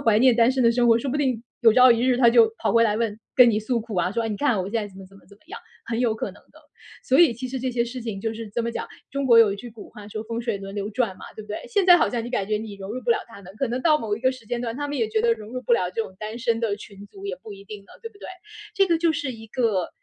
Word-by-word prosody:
怀 225 -6 +3
念 255 +1 +5
单 230 +1 +4
身 260 0 0
的 230 - +5
生 240 0 +2
活， 230 0 +5
说 260 +2 -3
不 290 - -1
定 255 -6 0 0.2
有 225 -2 +7
朝 255 +2 +7
一 230 -1 +4
日 255 -1 +3
她 240 -2 +6
就 230 -2 +5
跑 - - 0
回 230 0 +5
来 215 -1 +1
问 220 -2 -2 0.2
跟 250 -2 +7
你 210 - +1
诉 230 +2 -1
苦 220 -3 -7
啊， 180 +1 0
说： 230 0 -1
“你 210 - -3
看 250 -3 +1
我 - - -3
现 - - -11
在 220 -2 0
怎 190 - -17
么 195 - -10
怎 195 - -18
么 - - -20
怎 200 - -17
么 - - -35
样”， 400 - -7 0.3
很 230 -1 -2
有 240 -3 +1
可 220 - -4
能 - - -17
的。 - - -18 0.4
所 265 - +2
以 335 -7 +6
其 250 +3 -6
实 260 +1 -4
这 255 +1 -2
些 235 -1 0
事 245 +2 -7
情 220 -4 -5
就 225 +2 -2
是， 225 0 -7
怎 235 +3 -2
么 235 - -2
讲， - - -5 0.2
中 275 0 -2
国 235 -2 +7
有 220 -3 +6
一 200 - -5
句 240 +4 -9
古 220 -2 -12
话 205 -1 -12
说： 215 +1 -5
“风 230 +1 -4
水 230 -4 -2
轮 195 +1 -8
流 205 +1 -4
转” 220 -4 -1
嘛， - - -11
对 215 - -8
不 210 - -17
对？ 210 - -4
现 410 -5 +1
在 355 -1 +9
好 - - +2
像 235 -2 -3
你 240 - -6
感 205 -6 -1
觉 210 0 0
你 215 -2 -8
融 195 0 -8
入 255 - -4
不 235 - -1
了 - - +4
她 215 -3 -13
们， 190 - -12
可 270 - -1
能 245 +2 -2
到 310 -2 +4
某 210 -4 -2
一 - - -11
个 260 +1 +3
时 255 -4 -14
间 240 +1 -3
段， 235 -1 -4
她 290 +1 -3
们 290 - -3
也 225 -3 0
觉 220 0 0
得 230 +1 +3
融 215 -2 -11
入 255 +1 -5
不 245 - 0
了 180 -6 +2
这 185 - -3
种 190 - -11
单 215 +2 -6
身 230 -2 0
的 215 -3 -1
群 200 -1 -12
组 395 0 -10
也 - - -3
不 215 - -9
一 195 0 -12
定 210 0 -9
呢， - - -30
对 455 - -6
不 405 - -21
对？ - - -9 0.5
这 390 - +3
个 335 -3 +2
就 335 -1 +2
是 290 -4 -3
一 225 -1 -12
个 215 -7 0
230 Hz, 380 characters per minute, -24 LUFS, 210-250 Hz, 0.5 s, 在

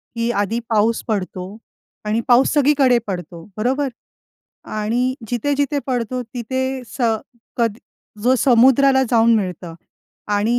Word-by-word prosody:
की 230 0 -1
आधी 205 +3 0
पाऊस 225 +1 +2
पडतो 190 -2 -4 0.5
आणि 215 +2 0
पाऊस 250 +1 +5
सगळीकडे 280 -3 +4
पडतो, 175 -3 -6
बरोबर. 265 +6 0 0.8
आणि 235 +4 -1
जिथे-जिथे 285 +4 0
पडतो 250 -1 -2
तिथे 260 +3 -4
स 260 - -11 0.6
कद 230 -2 +1 0.5
जो 250 +3 +4
समुद्राला 265 +2 +5
जाऊन 230 -1 +4
मिळतं. 180 -4 -4 0.5
आणि 210 +4 +1
235 Hz, 115 wpm, -20 LUFS, 215-260 Hz, 0.8 s, पाऊस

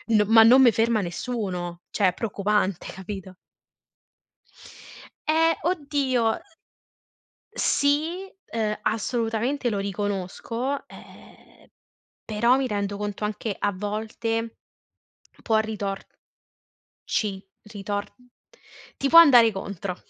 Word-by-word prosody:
N 210 - +5
ma 225 +1 +7
non 250 +4 +7
me 240 - +7
ferma 225 -1 +1
nessuno, 175 -3 -4
cioè 200 - +2
è - - -5
preoccupante, 200 -2 -1
capito? 190 -1 -8 1.9
Eh, 325 +1 +3
oddio, 285 -7 0
uhm, - - -2 1.1
sì, 325 +2 0 0.2
uhm, 215 -2 -1
assolutamente 230 +4 -1
lo 205 -3 -2
riconosco, 205 +7 -3
ehm, - - -17 0.6
però 235 +3 +2
mi 270 -1 0
rendo 200 -2 -3
conto 205 0 -5
anche 210 0 -3
a 205 - 0
volte 225 +3 -3 0.9
può 220 - +2
ritor 205 -3 -3 1.0
ci 200 -3 -2 0.2
ritor 205 -1 -4 0.9
ti 275 - 0
può 330 - +10
andare 245 -9 +7
contro, 195 -1 -5
220 Hz, 100 wpm, -25 LUFS, 200-245 Hz, 1.9 s, può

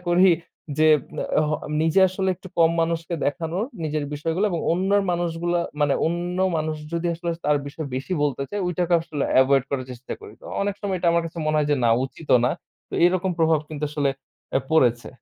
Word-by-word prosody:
করি 180 +2 +5 0.5
যে 155 - +5 0.5
অ - - +3
হ - - 0 0.3
নিজে 160 +4 +3
আসলে 190 +1 -2
একটু 190 - -12
কম 165 -1 +6
মানুষকে 165 +1 -2
দেখানোর, 165 +7 -1 0.2
নিজের 155 -1 -1
বিষয়গুলো 165 +6 -1
এবং 170 -3 -1
অন্যর 195 +3 +2
মানুষগুলা 175 0 -1 0.2
মানে 145 -2 +3
অন্য 175 +2 -2 0.2
মানুষ 155 0 -2 0.2
যদি 170 +1 -1
আসলে 170 +1 -3
তার 150 0 +3
বিষয়ে 145 +1 -6
বেশি 135 +8 -4
বলতে 140 -2 0
চায়, 205 0 -3
ঐটাকে 180 0 +1
আসলে 150 -4 -3 0.2
avoid 135 0 +3
করার 135 -2 -2
চেষ্টা 125 +1 -7
করি। - - -11
তো - - -19 0.2
অনেক 200 -1 -1
সময় 200 -3 -1
এটা 170 - +1
আমার 170 0 +2
কাছে 165 +1 -9
মনে 155 0 +2
হয় 150 -1 +1
যে, 145 - +3
"না! 115 - +4
উচিতও 135 -1 +1
না।" - - +2 0.4
তো - - -7
এরকম 185 +1 +2
প্রভাব 160 -2 +3
কিন্তু 155 -1 -4
আসলে 145 -2 +1 0.5
এ - - +5
পড়েছে। 120 -7 +3
165 Hz, 195 wpm, -24 LUFS, 150-175 Hz, 0.5 s, কম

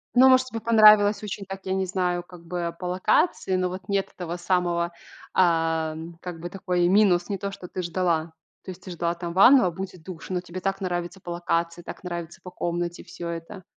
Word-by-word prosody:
Ну 260 +1 +8
может 260 0 +5
тебе, 230 -2 -5
понравилось 215 -2 +6
очень 200 -1 -5
так 195 0 -8
я 190 - -1
не 190 -1 0
знаю 180 -1 0
как 175 -2 -15
бы 170 -1 -3
по 180 - -6
локации, 185 - +1
но 185 0 0
вот 185 +2 -8
нет 200 -1 0
этого 175 -1 -5
самого, 175 -1 0 0.4
ам, 165 -1 +1
как 175 -2 -7
бы 175 +2 -6
такой 180 -2 0
минус, 185 -2 +4
не 200 - -1
то, 200 -1 -3
что 185 -2 -9
ты 185 - -4
ждала. 170 -2 -1 0.3
То - - -10
есть, 185 0 -13
ты 185 - -8
ждала 170 0 -2
ванну, 190 +9 +6
а 180 - +1
будет 185 -1 -7
душ, 175 -3 -9
но 185 -1 -1
тебе 180 +1 -8
так 195 0 -1
нравится 175 0 -3
по 175 - -8
локации, 170 0 -1
так - - -9
нравится 175 -2 -6
по 180 - -9
комнате 175 0 -3
всё 170 - -8
это. 170 +4 -7
180 Hz, 210 wpm, -25 LUFS, 170-190 Hz, 0.4 s, Ну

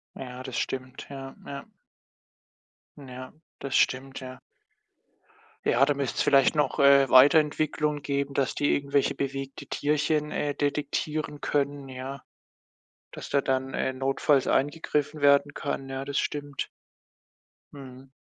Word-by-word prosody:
Ja, 125 -1 -8
das 130 -3 -5
stimmt, 130 0 -4
ja, 135 -1 -8
ja. 140 0 -7 1.3
Ja, 130 -2 -10 0.3
das 135 -1 -3
stimmt, 135 +1 +1
ja. 130 -1 -9 1.3
Ja, 125 - +4
da 145 - +2
müsst's 140 -2 -2
vielleicht 140 +1 +4
noch, 150 0 0
äh, 140 -1 +6
Weiterentwicklung 150 +2 +4
geben, 140 0 -2
dass 135 -2 0
die 145 - +2
irgendwelche 140 -1 +1
bewegte 135 0 -5
Tierchen, 150 +1 0
äh, 145 -1 -2
detektieren 150 +1 -2
können, 140 -1 -1
ja. 130 +1 -7 0.9
Dass - - -9
da 140 - +2
dann, 130 0 -1
äh, 130 - -1
notfalls 135 +1 +1
eingegriffen 150 +1 0
werden 140 0 +4
kann, 135 -2 -4
ja, 135 0 -5
das 140 0 -3
stimmt. 145 -1 -3 1.1
Mhm. 130 -1 -12
140 Hz, 125 wpm, -27 LUFS, 135-145 Hz, 1.3 s, äh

